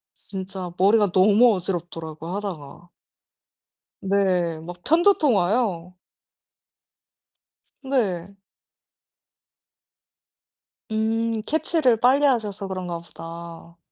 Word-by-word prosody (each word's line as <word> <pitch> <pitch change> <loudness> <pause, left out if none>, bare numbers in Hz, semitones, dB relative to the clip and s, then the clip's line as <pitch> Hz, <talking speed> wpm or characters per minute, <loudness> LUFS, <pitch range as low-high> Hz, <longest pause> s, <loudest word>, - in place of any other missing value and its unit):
진짜 190 -2 -7
머리가 205 0 +4
너무 210 +5 +5
어지럽더라고요 170 -2 -5
하다가. 170 -5 -7 1.1
네. 185 -4 +1
막 175 +2 -8
편두통 325 - +4
와요. 180 -2 0 1.9
네. 200 -8 -2 2.5
음. 225 +1 -1
캐치를 310 -5 +2
빨리 265 +4 +4
하셔서 215 -6 -1
그런가 180 -2 -4
보다. 170 0 -11
195 Hz, 170 characters per minute, -23 LUFS, 175-225 Hz, 2.5 s, 너무